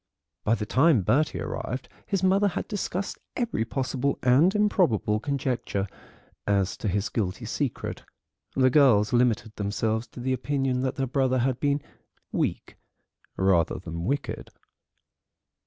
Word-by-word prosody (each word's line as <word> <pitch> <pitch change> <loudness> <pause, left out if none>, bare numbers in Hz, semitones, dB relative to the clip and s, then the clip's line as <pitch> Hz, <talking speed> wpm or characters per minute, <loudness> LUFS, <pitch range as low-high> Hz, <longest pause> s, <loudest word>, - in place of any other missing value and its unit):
By 110 - +3
the 105 - -3
time 130 - +4
Bertie 150 - +2
arrived 130 +2 -4 0.2
his 195 -2 -1
mother 195 +2 +4
had 195 - -3
discussed 195 -2 -3 0.2
every 235 - -1
possible 135 +2 -1
and 140 - +5
improbable 175 - +2
conjecture 130 -7 -2 0.6
as 100 -2 +1
to - - -4
his 100 +2 0
guilty 95 -4 -2
secret; - - -3 0.5
the 130 -1 +4
girls 125 -8 +5
limited 120 -2 +2
themselves 110 +3 -1
to 120 - -12
the 130 +2 0
opinion 130 0 0
that 130 0 -1
their 135 -1 0
brother 130 0 +1
had 130 0 0
been 145 0 +1 0.5
weak - - -2 0.6
rather 95 -4 +2
than 85 0 -6
wicked. 140 +2 -2
130 Hz, 135 wpm, -26 LUFS, 105-145 Hz, 0.6 s, and